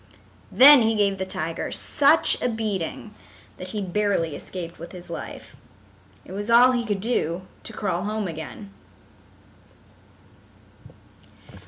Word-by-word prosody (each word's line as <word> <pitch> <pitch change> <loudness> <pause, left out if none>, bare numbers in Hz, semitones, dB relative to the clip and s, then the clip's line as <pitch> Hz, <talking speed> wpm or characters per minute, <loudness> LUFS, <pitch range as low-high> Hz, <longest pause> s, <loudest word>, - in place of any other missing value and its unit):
Then 280 0 +9
he 225 0 +1
gave 200 -2 +1
the 190 - -3
tiger 165 -2 -4
such 290 +3 +2
a - - 0
beating 215 -2 -4 0.4
that 185 - -8
he 205 +2 -4
barely 190 -5 -1
escaped 170 0 -8
with 170 +3 -10
his 175 -1 -11
life. - - -8 0.7
It - - -13
was 205 +3 -5
all 245 +2 +6
he 240 -2 -2
could 205 -2 -2
do 185 -6 -1 0.2
to - - -8
crawl 190 -5 -3
home 215 -1 -3
again. 170 +5 -9
200 Hz, 130 wpm, -23 LUFS, 175-225 Hz, 0.7 s, Then